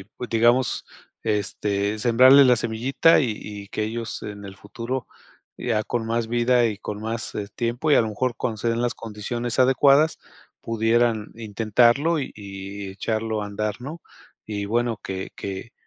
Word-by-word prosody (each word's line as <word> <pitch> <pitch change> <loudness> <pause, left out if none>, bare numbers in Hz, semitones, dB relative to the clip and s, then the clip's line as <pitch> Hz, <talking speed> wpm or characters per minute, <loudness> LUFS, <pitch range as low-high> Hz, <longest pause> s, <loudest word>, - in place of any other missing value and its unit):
y 95 - -11
pue 110 +4 -8
digamos, 120 +2 +2 0.4
este, 105 0 -1
sembrarle 130 +4 +7
la 125 -1 +5
semillita 120 +9 +3
y 135 - +1 0.2
y 100 -1 -8
que 110 - -3
ellos 115 +1 -4
en 100 -1 -7
el 95 0 -10
futuro, 120 +4 -5 0.5
ya 110 -3 0
con 115 -2 -2
más 115 0 -1
vida 120 +1 +3
y 105 -2 -3
con 105 0 -6
más 115 +1 -4 0.2
tiempo 120 +6 -1
y - - +7
a - - +6
lo 110 - 0
mejor 120 +2 -2
cuando 110 -2 -2
se 115 - -2
den 115 +1 -1
las 120 -1 0
condiciones 115 +2 -5
adecuadas, 140 +4 +4 0.4
pudieran 115 -1 +1
intentarlo 115 +8 +2
y 135 - -4
y 100 0 -7
echarlo 110 +2 -2
a - - -4
andar, 105 +2 -3
¿no?, 155 +5 -7 0.5
y 105 -1 -3
bueno, 115 +1 0
que 95 0 -5
que 100 +4 -6
115 Hz, 165 wpm, -24 LUFS, 105-120 Hz, 0.5 s, sembrarle